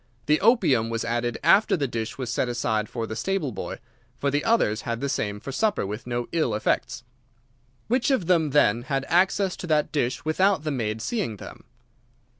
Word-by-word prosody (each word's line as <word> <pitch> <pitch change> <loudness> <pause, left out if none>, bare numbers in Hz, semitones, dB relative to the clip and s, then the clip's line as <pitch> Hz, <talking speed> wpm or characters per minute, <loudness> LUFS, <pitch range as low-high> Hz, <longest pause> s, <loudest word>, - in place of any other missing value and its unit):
The 150 +1 +2
opium 140 - +3
was 115 -1 -2
added 120 0 -1
after 205 -1 +5
the 140 -3 -1
dish 115 -2 -4
was 125 -3 -3
set 125 - 0
aside 110 -3 -1
for 115 -2 -3
the 110 - -6
stable 175 - -1
boy, - - -6 0.4
for 140 - 0
the 145 +1 0
others 170 - +2
had 115 -1 -3
the 140 - -2
same 105 -6 -2
for 135 - -7
supper 210 - 0
with 105 +5 -6
no 120 -1 -2
ill 155 -10 0
effects. 120 +3 -1 0.8
Which 245 +3 +1
of 260 -10 +1
them, 165 -3 +3
then, 120 -6 +3
had 135 +2 -2
access 190 +2 +2
to 180 - -7
that 150 -2 +1
dish 130 -3 -1
without 185 +1 +2
the 155 - -2
maid 110 -4 -2
seeing 200 - -2
them? - - -11
135 Hz, 195 wpm, -25 LUFS, 115-170 Hz, 0.8 s, after